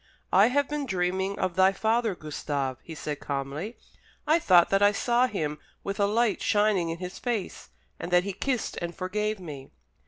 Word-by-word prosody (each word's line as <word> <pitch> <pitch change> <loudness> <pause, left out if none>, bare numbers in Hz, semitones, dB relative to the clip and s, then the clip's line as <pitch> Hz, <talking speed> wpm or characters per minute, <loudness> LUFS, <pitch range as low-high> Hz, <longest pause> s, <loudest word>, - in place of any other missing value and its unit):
"I 195 +4 +7
have 280 +3 +1
been 295 -2 -3
dreaming 190 0 -1
of 185 -2 -1
thy 190 +1 +5
father, 220 0 +1
Gustave," 145 -4 -3
he 165 - -9
said 150 -1 -4
calmly. 140 - -4 0.5
"I 315 +3 +4
thought 180 - +5
that 195 0 +3
I 205 0 +6
saw 240 +4 +2
him 150 -9 -3 0.2
with 200 +1 -4
a 200 - +3
light 225 +1 +1
shining 205 -5 +2
in 165 - -3
his 180 +1 -7
face, 230 -6 -3 0.3
and - - -5
that 180 0 +5
he 200 0 -3
kissed 250 +5 -2
and 170 0 -4
forgave 210 +3 -2
me." 145 -7 -8
190 Hz, 185 wpm, -27 LUFS, 170-215 Hz, 0.5 s, I